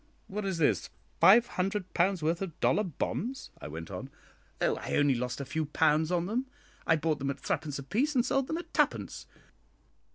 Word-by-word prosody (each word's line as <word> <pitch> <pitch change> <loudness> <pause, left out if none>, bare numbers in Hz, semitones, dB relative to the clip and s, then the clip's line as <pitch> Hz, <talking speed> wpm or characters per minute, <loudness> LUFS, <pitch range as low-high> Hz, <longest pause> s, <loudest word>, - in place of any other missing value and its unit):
"What 210 +1 -4
is 190 -3 -1
this? 130 - +2 0.3
five 225 +5 +8
hundred 190 -2 -2
pounds' 180 -1 +2
worth 165 +3 +1
of 180 -5 -5
dollar 210 - +3
bonds?" 230 - -3
I - - -6
went 80 +2 -7
on. - - -6 0.5
"Oh, - - +1
I - - -3
only 145 -1 +4
lost 125 +1 -3
a 140 - -4
few 155 +4 -2
pounds 155 +2 +2
on 175 -1 +1
them. 240 +7 -1 0.4
I 160 - +5
bought 155 -1 0
them 140 0 -2
at 140 0 -3
threepence 145 -2 -2
apiece 235 - 0
and 245 -1 +3
sold 270 -1 +1
them 320 - -2
at 345 - -8
twopence. - - 0
170 Hz, 195 wpm, -30 LUFS, 145-210 Hz, 0.5 s, five